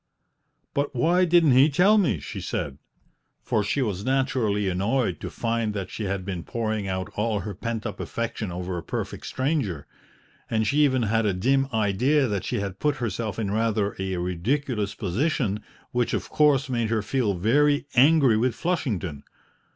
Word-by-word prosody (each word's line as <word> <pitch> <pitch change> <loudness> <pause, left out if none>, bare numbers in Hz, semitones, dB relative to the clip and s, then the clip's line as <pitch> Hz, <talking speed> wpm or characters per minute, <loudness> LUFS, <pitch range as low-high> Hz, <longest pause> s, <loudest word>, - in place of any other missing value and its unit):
"But 140 -1 -1
why 175 +8 +3
didn't 170 -3 +5
he 130 +4 +6
tell 195 +9 +4
me?" 135 - +1
she 70 - -7
said, 70 0 -4 0.6
for 105 - +1
she 130 +7 0
was 100 -4 -3
naturally 130 -6 +1
annoyed 95 - 0
to - - -5
find 115 -2 -2
that 95 -2 -4
she 110 - -4
had 95 -1 -3
been 95 -4 -4
pouring 110 -3 -2
out 95 0 -3
all 105 -1 0
her 100 +2 -5
pent 115 +3 -4
up - - -5
affection 115 -4 -3
over 90 0 -4
a - - -9
perfect - - -5
stranger, 130 - -1 0.6
and 110 -1 +1
she 145 +8 +3
even 130 -3 +1
had 110 0 +1
a 100 - +1
dim 135 +8 +2
idea 125 +7 +2
that 100 -4 -2
she - - -1
had 100 -1 -5
put 150 -1 +1
herself 115 -3 -3
in 105 -3 -2
rather 110 -2 0
a 95 -1 -2
ridiculous 105 - -1
position, 105 - -1 0.3
which 120 -1 0
of - - -4
course 145 -3 +3
made 120 -4 -1
her 110 -2 0
feel 110 -3 0
very 145 +10 +2
angry 135 -3 +5
with 120 +1 +1
Flushington. 115 - -2
115 Hz, 175 wpm, -25 LUFS, 100-135 Hz, 0.6 s, he